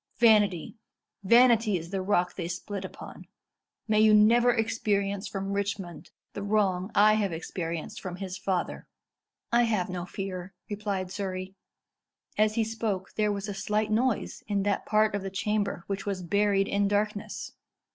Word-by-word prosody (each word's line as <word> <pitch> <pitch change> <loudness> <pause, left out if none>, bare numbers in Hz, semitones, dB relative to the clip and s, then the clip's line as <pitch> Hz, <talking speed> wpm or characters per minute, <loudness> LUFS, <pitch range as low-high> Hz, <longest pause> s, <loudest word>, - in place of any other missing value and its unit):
Vanity 210 -5 +3 0.5
vanity 230 -1 +5
is 170 +1 -8
the 195 -1 -1
rock 185 -2 +1
they 170 -3 -4
split 190 +3 -5
upon. 190 - -10 0.6
May 215 -1 +3
you 215 0 +6
never 235 +3 +5
experience 205 -3 0
from 195 0 -4
Richmond 195 -3 -4 0.2
the 200 - -5
wrong 200 -2 +1
I 210 +1 +6
have 210 -3 +1
experienced 165 0 -5
from 185 -2 -5
his 185 0 -5
father." 190 -2 -2 0.6
"I 240 0 +4
have 205 -6 0
no 180 -1 -4
fear," 190 -1 -6 0.2
replied 200 -3 -3
Surrey. 185 -1 -4 0.8
As 215 0 +2
he 230 - +2
spoke, 215 -4 -3
there 210 -1 +1
was 200 0 -3
a 205 - -3
slight 210 +2 -1
noise 235 +1 0
in 200 -2 0
that 205 0 -1
part 215 0 +3
of 205 - -1
the 195 - -4
chamber 200 -1 -1
which 195 0 -4
was 190 -2 -2
buried 200 +1 +2
in 200 0 +1
darkness. 205 0 -2
200 Hz, 155 wpm, -28 LUFS, 190-215 Hz, 0.8 s, you